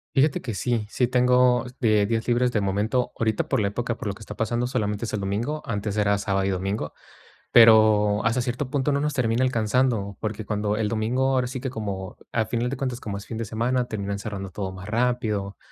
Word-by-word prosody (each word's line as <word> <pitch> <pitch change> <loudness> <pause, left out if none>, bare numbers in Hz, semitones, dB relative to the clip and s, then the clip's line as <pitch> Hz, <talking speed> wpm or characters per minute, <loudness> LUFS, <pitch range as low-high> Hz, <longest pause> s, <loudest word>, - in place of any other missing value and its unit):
Fíjate 135 +2 +3
que 115 -4 -4
sí, 115 0 -1
sí 125 - +1
tengo 125 0 +3
de 110 -4 +3
días 115 +1 -1
libres 125 +1 +2
de 110 - 0
momento. 105 +6 0
Ahorita, 110 -2 0
por - - +1
la 100 - +1
época 120 +3 -3
por 105 - -5
lo 100 - -2
que - - -15
está 105 -1 -8
pasando, 120 +2 0
solamente 105 -4 -1
es 110 - -4
el 105 - -1
domingo, 110 +10 -2
antes 105 -1 -3
era 100 -1 +2
sábado 95 -1 0
y - - +1
domingo. 95 -3 -2 0.6
Pero 110 -2 +6
hasta 115 +3 +2
cierto 125 +2 -2
punto 140 +1 0
no 140 0 +1
nos 150 +1 -1
termina 120 0 +1
alcanzando, 115 -4 +1
porque 110 0 -3
cuando 105 0 -1
el 110 -1 0
domingo, 120 +5 +1
ahora 130 -1 +2
sí 125 +1 -5
que 130 0 -3
como 100 -5 -5 0.2
a 115 - +1
final 120 +2 -1
de 135 - -3
cuentas, 125 -2 -3
como 105 -5 -5
es 100 - -11
fin 115 - -6
de 115 - -2
semana, 120 +3 0
terminan 100 -4 -3
cerrando 100 -2 -5
todo 95 +1 -4
más 95 +1 -9
rápido. 110 -4 0
110 Hz, 220 wpm, -25 LUFS, 105-125 Hz, 0.6 s, Pero